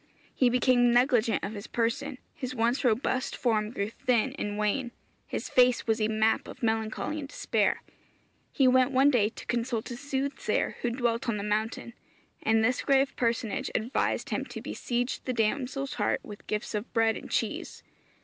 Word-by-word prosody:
He 255 Hz, -, +3 dB
became 245 Hz, 0 st, +4 dB
negligent 240 Hz, -2 st, +3 dB
of 200 Hz, -, -3 dB
his 205 Hz, -1 st, -7 dB
person; 250 Hz, +4 st, -1 dB, 0.2 s
his 255 Hz, -3 st, -5 dB
once 235 Hz, +2 st, +1 dB
robust 255 Hz, +2 st, +1 dB
form 215 Hz, -4 st, +1 dB
grew 205 Hz, -2 st, -3 dB
thin 255 Hz, 0 st, +1 dB
and 205 Hz, 0 st, -3 dB
wan; 215 Hz, +5 st, 0 dB, 0.4 s
his -, -, -4 dB
face 250 Hz, -1 st, +4 dB
was 225 Hz, 0 st, +1 dB
a 215 Hz, -, +3 dB
map 220 Hz, 0 st, +1 dB
of 255 Hz, -, -11 dB
melancholy 225 Hz, +7 st, -1 dB
and 285 Hz, -, -6 dB
despair. -, -, 0 dB, 0.7 s
He 270 Hz, -, +3 dB
went 255 Hz, 0 st, +5 dB
one 270 Hz, +1 st, +4 dB
day 215 Hz, -5 st, +3 dB
to -, -, -11 dB
consult 235 Hz, 0 st, -2 dB
a -, -, -4 dB
soothsayer 275 Hz, +1 st, -1 dB
who 240 Hz, -, +1 dB
dwelt 235 Hz, 0 st, -1 dB
on 220 Hz, -, 0 dB
the 200 Hz, -, -4 dB
mountain, 215 Hz, +3 st, -2 dB, 0.5 s
and 220 Hz, 0 st, +3 dB
this 250 Hz, +2 st, +1 dB
grave 275 Hz, 0 st, +2 dB
personage 230 Hz, -3 st, -1 dB
advised 235 Hz, +5 st, -1 dB
him -, -, 0 dB
to -, -, -7 dB
besiege 245 Hz, +1 st, -2 dB
the 255 Hz, -, -1 dB
damsel's 265 Hz, +4 st, -1 dB
heart 205 Hz, -, 0 dB
with 210 Hz, -1 st, -11 dB
gifts 210 Hz, +1 st, -3 dB
of 210 Hz, +2 st, -4 dB
bread 225 Hz, -1 st, +3 dB
and -, -, -8 dB
cheese. -, -, -2 dB
240 Hz, 175 wpm, -28 LUFS, 220-255 Hz, 0.7 s, went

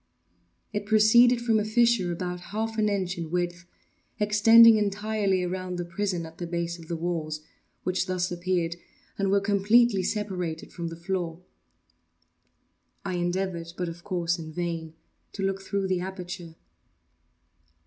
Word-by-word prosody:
It 205 Hz, -1 st, -3 dB
proceeded 235 Hz, +3 st, +6 dB
from 225 Hz, -2 st, +3 dB
a -, -, 0 dB
fissure, 220 Hz, -4 st, +2 dB
about 180 Hz, +1 st, -4 dB, 0.2 s
half 220 Hz, 0 st, -2 dB
an 210 Hz, -1 st, +3 dB
inch 185 Hz, -3 st, -2 dB
in 165 Hz, -2 st, -4 dB
width, 175 Hz, 0 st, -2 dB, 0.5 s
extending 220 Hz, +2 st, +7 dB
entirely 205 Hz, -2 st, 0 dB
around 180 Hz, 0 st, -3 dB
the 175 Hz, -, -3 dB
prison 175 Hz, -1 st, -2 dB
at 160 Hz, 0 st, -13 dB
the 175 Hz, -, -4 dB
base 170 Hz, 0 st, -3 dB
of 165 Hz, -, -12 dB
the 170 Hz, -, -3 dB
walls, 160 Hz, -2 st, -3 dB, 0.4 s
which 185 Hz, +1 st, 0 dB
thus 185 Hz, -1 st, -1 dB
appeared, 175 Hz, -1 st, -1 dB, 0.4 s
and 195 Hz, -1 st, +1 dB
were, 200 Hz, +1 st, +4 dB
completely 205 Hz, +2 st, +3 dB
separated 180 Hz, -5 st, -3 dB
from 170 Hz, -1 st, -4 dB
the 165 Hz, -, -6 dB
floor. 175 Hz, -1 st, -3 dB, 1.6 s
I 190 Hz, -, -2 dB
endeavored, 175 Hz, -1 st, -2 dB
but 180 Hz, -2 st, -2 dB
of 170 Hz, +1 st, -10 dB
course 175 Hz, -3 st, -1 dB
in 160 Hz, -1 st, -7 dB
vain, 165 Hz, -1 st, -4 dB, 0.4 s
to 195 Hz, -, -4 dB
look 195 Hz, 0 st, -1 dB
through 195 Hz, 0 st, -2 dB
the 185 Hz, -1 st, 0 dB
aperture. 180 Hz, -2 st, -7 dB
185 Hz, 150 wpm, -27 LUFS, 170-205 Hz, 1.6 s, extending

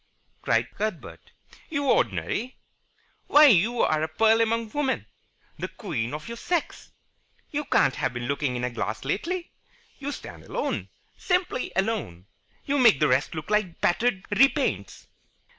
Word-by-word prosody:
cried -, -, +1 dB
Cuthbert. 210 Hz, -5 st, -5 dB, 0.4 s
"You 295 Hz, -3 st, -1 dB
ordinary? 125 Hz, -, 0 dB, 0.7 s
Why, 300 Hz, +1 st, +8 dB
you 230 Hz, -, +4 dB
are 155 Hz, 0 st, +2 dB
a 160 Hz, -, 0 dB
pearl 220 Hz, +8 st, +3 dB
among 230 Hz, -1 st, 0 dB
women, 285 Hz, -1 st, -1 dB, 0.5 s
the -, -, -2 dB
queen 145 Hz, -, -4 dB
of 155 Hz, +1 st, -8 dB
your 235 Hz, -, -6 dB
sex. 345 Hz, +5 st, -3 dB, 0.6 s
You 295 Hz, 0 st, -2 dB
can't 135 Hz, -, +2 dB
have -, -, 0 dB
been 120 Hz, -1 st, -5 dB
looking 140 Hz, -1 st, -1 dB
in 120 Hz, -, -3 dB
a 125 Hz, -, -1 dB
glass 110 Hz, 0 st, -4 dB
lately. 335 Hz, -, -2 dB, 0.5 s
You 280 Hz, +1 st, -4 dB
stand -, -, -9 dB
alone. -, -, -3 dB, 0.3 s
Simply 360 Hz, -8 st, -1 dB
alone. 190 Hz, -, -2 dB, 0.4 s
You 285 Hz, 0 st, +1 dB
make 230 Hz, -, +6 dB
the -, -, +4 dB
rest 130 Hz, +5 st, +1 dB
look 155 Hz, +5 st, -6 dB
like 210 Hz, -5 st, 0 dB
battered 195 Hz, +2 st, +1 dB
repaints." 270 Hz, +7 st, +1 dB
215 Hz, 145 wpm, -26 LUFS, -, 0.7 s, Why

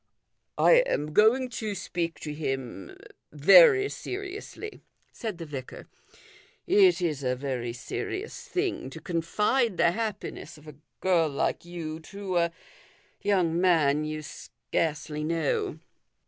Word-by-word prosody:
" -, -, -52 dB
I -, -, +6 dB
am 150 Hz, -, -2 dB
going 225 Hz, +7 st, +4 dB
to 215 Hz, -4 st, -4 dB
speak 175 Hz, -3 st, -3 dB
to 150 Hz, -, -5 dB
him 135 Hz, -, -5 dB, 0.3 s
very 445 Hz, -5 st, +7 dB
seriously," 405 Hz, +2 st, -7 dB, 0.3 s
said 220 Hz, -6 st, -5 dB
the 165 Hz, -, -7 dB
vicar. 135 Hz, -4 st, -8 dB, 0.5 s
" 415 Hz, 0 st, -24 dB, 0.2 s
It 375 Hz, -, +5 dB
is 155 Hz, -5 st, -1 dB
a 125 Hz, -1 st, 0 dB
very 125 Hz, -3 st, -3 dB
serious 380 Hz, -, -5 dB
thing 370 Hz, -, -2 dB
to 160 Hz, -, -9 dB
confide 210 Hz, +7 st, 0 dB
the 170 Hz, -, +4 dB
happiness 215 Hz, -5 st, -5 dB
of 150 Hz, +1 st, -17 dB
a 150 Hz, -, -9 dB, 0.3 s
girl 170 Hz, -4 st, +3 dB
like 140 Hz, +3 st, -1 dB
you 165 Hz, -2 st, -6 dB
to 190 Hz, +2 st, -4 dB
a 170 Hz, -1 st, +2 dB, 0.7 s
young 180 Hz, -4 st, +1 dB
man 155 Hz, -5 st, +3 dB
you 155 Hz, 0 st, -4 dB
scarcely 150 Hz, -, -3 dB
know." 375 Hz, -, -1 dB
170 Hz, 135 wpm, -27 LUFS, 150-240 Hz, 0.7 s, very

